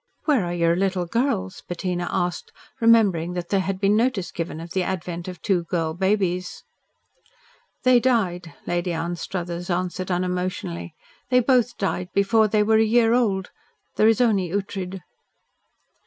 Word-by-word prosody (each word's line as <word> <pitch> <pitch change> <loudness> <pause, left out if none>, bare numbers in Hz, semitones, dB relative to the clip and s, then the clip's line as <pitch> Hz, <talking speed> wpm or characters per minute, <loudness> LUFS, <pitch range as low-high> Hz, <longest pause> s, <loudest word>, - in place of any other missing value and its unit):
"Where 285 -9 +3
are 175 - -3
your 170 -1 +2
little 190 -1 0
girls?" 215 -2 -1
Bettina 175 0 -3
asked, 180 -2 -2 0.3
remembering 205 -7 +4
that 175 -1 -5
there 200 - +2
had 190 0 -2
been 200 +1 +3
notice 225 -5 0
given 165 -2 -4
of 165 +1 -9
the 190 - 0
advent 175 -2 -4
of 180 -2 -7
two 180 -4 +1
girl 165 -2 -1
babies. 185 -1 -1 1.2
"They 255 -2 +6
died," 185 -9 0
Lady 175 0 -1
Anstruthers 170 +1 -4
answered 180 +1 -2
unemotionally. 180 - -3 0.3
"They 250 0 +5
both 245 -1 +2
died 180 -2 -2
before 215 +2 +4
they 210 0 +2
were 220 +1 +3
a - - +5
year 225 +1 +3
old. 200 -6 +1 0.4
There 215 - +4
is 225 -1 +4
only 200 -7 +2
Ughtred." 190 -1 -4
185 Hz, 150 wpm, -23 LUFS, 175-215 Hz, 1.2 s, They